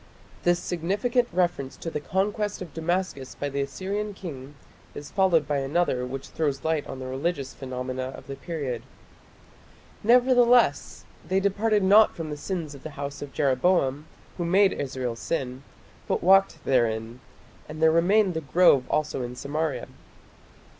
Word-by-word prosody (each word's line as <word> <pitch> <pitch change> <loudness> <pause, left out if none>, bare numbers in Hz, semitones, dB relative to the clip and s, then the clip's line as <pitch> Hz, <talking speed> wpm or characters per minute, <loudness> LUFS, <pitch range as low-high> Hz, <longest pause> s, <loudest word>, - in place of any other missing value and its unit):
This 175 0 +3
significant 205 +9 0
reference 175 -6 -1
to 165 - -5
the 150 - -2
conquest 205 +5 -1
of 175 - -12
Damascus 165 -5 -2
by 145 - -3
the 140 0 -2
Assyrian 195 +9 -3
king 145 -7 -8 0.4
is 145 - -8
followed 175 -7 +3
by 145 -1 0
another 135 -3 0
which 135 +1 -6
throws 145 -4 -2
light 160 -2 0
on 135 - -6
the 130 - -7
religious 135 +1 -3
phenomena 130 -1 -4
of - - -12
the 140 - -6
period: 140 -8 -4 1.2
"Nevertheless 245 +1 +4 0.2
they 190 +1 +2
departed 205 +1 +1
not 210 +3 +6
from 160 -2 -5
the - - -3
sins 165 -2 -4
of 140 - -12
the 155 - -7
house 140 0 -5
of 145 -1 -7
Jeroboam, 140 +1 +1 0.3
who - - 0
made 195 +3 +4
Israel 130 -4 -3
sin, 130 0 -3 0.5
but - - -1
walked 195 +2 +4
therein: 115 -2 0 0.5
and 155 0 -7
there 160 0 +5
remained 185 +4 +3
the 160 - -3
grove 140 -2 +4
also 150 -3 0
in 125 0 -5
Samaria". 145 +4 -3
160 Hz, 155 wpm, -26 LUFS, 135-190 Hz, 1.2 s, not